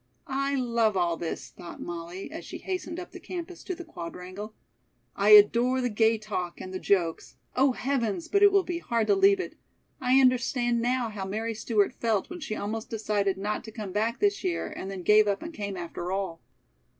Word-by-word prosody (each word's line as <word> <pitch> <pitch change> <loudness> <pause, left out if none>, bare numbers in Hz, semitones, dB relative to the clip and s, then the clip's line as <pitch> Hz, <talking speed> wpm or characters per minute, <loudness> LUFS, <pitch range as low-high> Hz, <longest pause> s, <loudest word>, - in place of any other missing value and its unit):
"I 275 +1 -1
love 235 -5 +1
all 170 -2 +2
this," 165 0 -5
thought 175 -1 -10
Molly, 175 - -6
as 325 - -7
she - - -7
hastened 365 -2 -4
up 355 - -8
the 365 - -9
campus 345 0 -7
to 370 - -3
the 350 - -9
Quadrangle. 185 - -8 0.6
"I 200 +1 +2
adore 235 +5 +7
the 250 -1 0
gay 225 +1 +3
talk 200 -5 -4
and 185 - -7
the 185 - -3
jokes 175 -5 0 0.2
oh, 265 +1 +4
heavens, 235 -10 -1
but 400 - +2
it 405 0 +8
will 395 -1 +4
be 345 -1 -3
hard 235 -8 0
to 400 - +4
leave 390 0 +5
it! 375 - -6 0.4
I 255 +1 +4
understand 245 -2 +2
now 245 0 0
how 205 -3 -5
Mary 220 +4 -2
Stewart 215 0 +1
felt 225 - -1
when 355 - -6
she 215 -8 -4
almost 220 +2 -4
decided 205 -3 0
not 205 +2 -2
to 220 - -8
come 210 -3 -6
back 220 +5 0
this 405 -1 +1
year 365 -2 -1
and 190 - -5
then 190 -2 -6
gave 210 +2 +6
up 200 -1 0
and 330 +1 -7
came 200 -7 -4
after 175 +1 -5
all." 190 -4 -3
225 Hz, 205 wpm, -28 LUFS, 195-270 Hz, 0.6 s, it